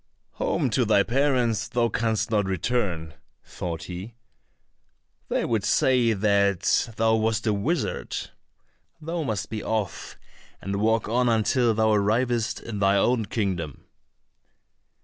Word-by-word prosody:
"Home - - 0
to - - +2
thy 100 - +4
parents 120 -5 +1
thou 115 +2 +1
canst 115 0 -1
not 105 -2 +2
return," 95 -4 -1 0.3
thought 85 -2 -5
he, 95 +6 -8 1.1
"they - - 0
would 110 -4 0
say 125 -1 +3
that 100 +1 +2
thou 110 0 +3
wast 110 0 0
a 110 - +2
wizard; 140 - -2 0.7
thou 165 +2 -3
must 110 -10 -3
be 110 -1 -3
off, 110 -3 -3 0.4
and 100 +1 -3
walk 110 +1 +2
on 120 +2 +2
until 115 +1 +2
thou 110 0 +3
arrivest 115 +2 +1
in 110 -3 -5
thine 100 0 +3
own 115 +2 +2
kingdom." 90 - -3
110 Hz, 130 wpm, -25 LUFS, 100-120 Hz, 1.1 s, thy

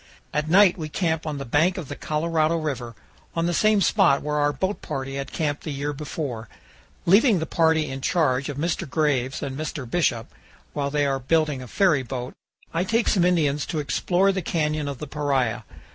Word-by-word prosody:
At 150 +1 -1
night 185 0 +5
we 155 -1 -4
camp 160 0 -1
on 150 -2 -3
the 140 - -5
bank 160 +9 +2
of 170 -6 -5
the 145 - -6
Colorado 155 +1 0
River, 130 -7 -4 0.4
on 165 0 0
the 175 - 0
same 215 +2 +3
spot 140 -5 +3
where 150 0 -1
our 145 0 +2
boat 190 +6 -2
party 135 0 -4
had 140 0 -5
camped 145 -3 -2
the - - -5
year 145 +1 -3
before. 135 -6 -5 0.6
Leaving 205 +4 +5
the 160 - -2
party 160 -1 +2
in 135 0 -5
charge 140 -5 +1
of 140 - -5
Mr. 165 0 -2
Graves 140 -4 0
and 135 -1 -4
Mr. 150 -3 -5
Bishop, 120 -5 0 0.5
while 140 -1 -1
they 145 0 +1
are 135 -1 0
building 150 0 +1
a 125 - -8
ferryboat, 130 - 0 0.4
I 165 +2 +1
take 230 +4 +1
some 185 - +3
Indians 150 -5 +2
to 165 - -3
explore 180 +6 +1
the 190 -1 -2
canyon 155 -3 -1
of 140 -2 -4
the 150 - -6
Paria. 140 -5 -1
150 Hz, 195 wpm, -24 LUFS, 140-165 Hz, 0.6 s, night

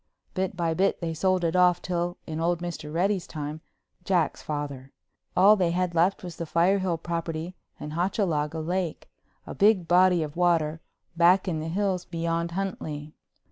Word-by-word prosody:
Bit 185 -1 -2
by 165 -2 0
bit 190 +4 +1
they 165 -2 -3
sold 185 +2 +1
it 165 +1 0
off 180 -1 +5
till 175 0 -2
in 155 0 -5
old 170 +1 +1
Mr. 165 -3 -6
Reddy's 185 +2 0
time—Jack's 160 +3 -3
father—all 145 +7 0
they 180 -4 +1
had 180 0 0
left 175 +4 +2
was 175 -2 -7
the 170 - -4
Firehill 180 +1 +2
property 165 +1 -4 0.3
and 150 - -6
Hochalaga 165 -4 0
Lake, 175 0 -3 0.3
a - - -7
big 200 -4 +3
body 180 -1 +4
of 150 -1 -7
water, 165 -3 +1 0.3
back 180 +3 +4
in 165 -4 -1
the 155 - -4
hills 185 +1 -1
beyond 170 0 -2
Huntley. 155 -6 -4
170 Hz, 155 wpm, -26 LUFS, 160-185 Hz, 0.3 s, off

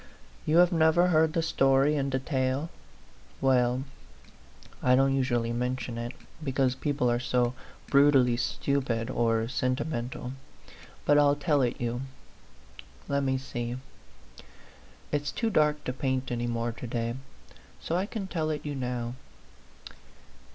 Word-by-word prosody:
You 155 - +3
have 175 0 +6
never 165 +1 +4
heard 160 -2 +3
the 165 - +1
story 135 -1 +3
in 140 -1 0
detail? 130 +2 -1 0.7
Well, 125 -1 +2 1.0
I 125 0 +4
don't 135 +1 +3
usually 120 -3 0
mention 125 0 -2
it, 120 +1 -4 0.3
because 135 -2 +1
peo 145 +2 -2
ple 125 -4 +1
are 120 - +1
so 125 -1 +1 0.3
brutally 140 -4 +5
stupid 125 -1 -1
or 115 -2 +1
sentimental; 125 0 -2 0.7
but 145 0 +5
I'll 145 0 +5
tell 145 -1 +1
it 125 -2 0
you. 120 +1 -2 1.1
Let 140 0 +1
me 130 -1 +1
see. 120 -2 -4 1.3
It's 145 -1 -1
too 225 -2 -1
dark 150 -4 +2
to 125 - -3
paint 130 -1 -2
any 120 0 -1
more 115 0 -1
to 120 +2 -8
day, 115 0 -2 0.7
so 165 - -3
I 185 +3 0
can 215 -3 -4
tell 160 -4 -2
it 150 -1 -3
you 145 - -3
now. 125 -3 -3
130 Hz, 135 wpm, -28 LUFS, 120-145 Hz, 1.3 s, have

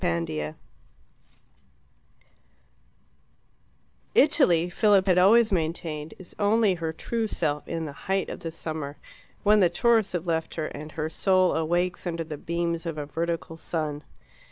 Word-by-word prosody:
Chapter 80 -2 -2 0.7
6 - - -38 1.9
Italy, 170 0 +5
Philip 195 +1 +3
had 180 -2 +4
always 215 +4 +5
maintained, 160 -3 -2
is 185 - -9
only 210 0 +3
her 165 -2 -3
true 225 +7 -3
self 150 -7 -2
in 165 -1 -3
the 150 - -5 0.2
height 195 -1 +1
of - - -6
the 165 - -5
summer, 155 -3 -5 0.5
when 210 0 +5
the 180 -3 +5
tourists 220 +3 +2
have 175 -1 -2
left 165 -2 -2
her, 155 - -2
and 155 0 -8
her 155 -1 -2
soul 185 +3 +2
awakes 175 +3 -1
under 165 -1 -2
the 155 -2 -7
beams 170 0 -2
of 165 -2 -4
a 150 - -3
vertical 165 +1 -3
sun. 155 -3 -3
170 Hz, 145 wpm, -26 LUFS, 155-185 Hz, 1.9 s, Italy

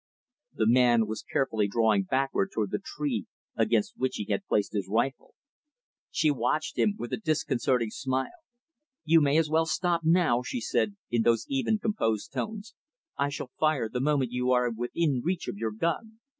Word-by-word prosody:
The 110 - +1
man 120 -1 +5
was 110 +1 -5
carefully 110 -6 0
drawing 110 -2 +2
backward 135 - 0
toward 105 -3 -2
the - - -2
tree 140 - -3 0.3
against 110 -1 +1
which 130 0 -1
he 105 - -3
had 100 - -1
placed 105 0 0
his 100 -3 -2
rifle. 120 +5 -1 0.7
She 155 -1 +2
watched 135 +4 -1
him, 210 - +2
with - - -6
a - - +1
disconcerting 130 - 0
smile. 130 +1 -2 0.7
"You 165 -1 +5
may 145 +1 +3
as 160 -1 +3
well 160 +1 +3
stop 175 -1 0
now," 160 -7 +3
she 245 - -4
said, 210 -3 0 0.2
in 120 -1 +2
those 115 0 +2
even, 260 -6 +1
composed 155 - -1
tones. 215 0 -5 0.4
"I 140 - 0
shall 140 -2 -6
fire, 155 -7 +2
the 125 +3 -4
moment 135 -3 +1
you 125 0 -1
are 125 -1 +3
within 125 +4 -1
reach 180 +1 -2
of - - -4
your 110 +1 -2
gun." 170 - -3
130 Hz, 175 wpm, -28 LUFS, 115-160 Hz, 0.7 s, man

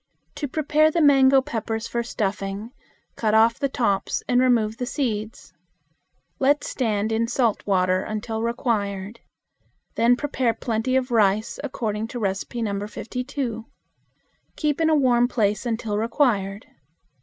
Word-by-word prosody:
To 290 - -4
prepare 305 +2 +2
the 335 - -1
mango 270 -3 +6
peppers 225 -4 -3
for 235 - -2
stuffing, 205 -1 -3 0.4
cut 215 -1 +1
off 225 +1 +4
the 275 - 0
tops 200 -7 0
and 245 0 +3
remove 230 -4 +2
the 250 - -3
seeds. 225 -6 -3 0.9
Let 285 +2 +3
stand 220 -4 -1
in 225 +1 +1
salt 235 -3 +1
water 185 -1 +2
until 220 +2 -4
required. 220 -3 -2 0.7
Then 235 +1 +4
prepare 255 -4 -1
plenty 235 +2 -1
of 260 -1 0
rice 215 -1 +2
according 220 -6 -3
to 245 +1 -6
No. 200 0 -2
52. 245 0 -4 0.9
Keep 300 0 -1
in 320 - +3
a 315 - +4
warm 245 -4 +3
place 215 -1 0
until 220 -2 -2
required. 220 -4 0
230 Hz, 130 wpm, -23 LUFS, 215-255 Hz, 0.9 s, mango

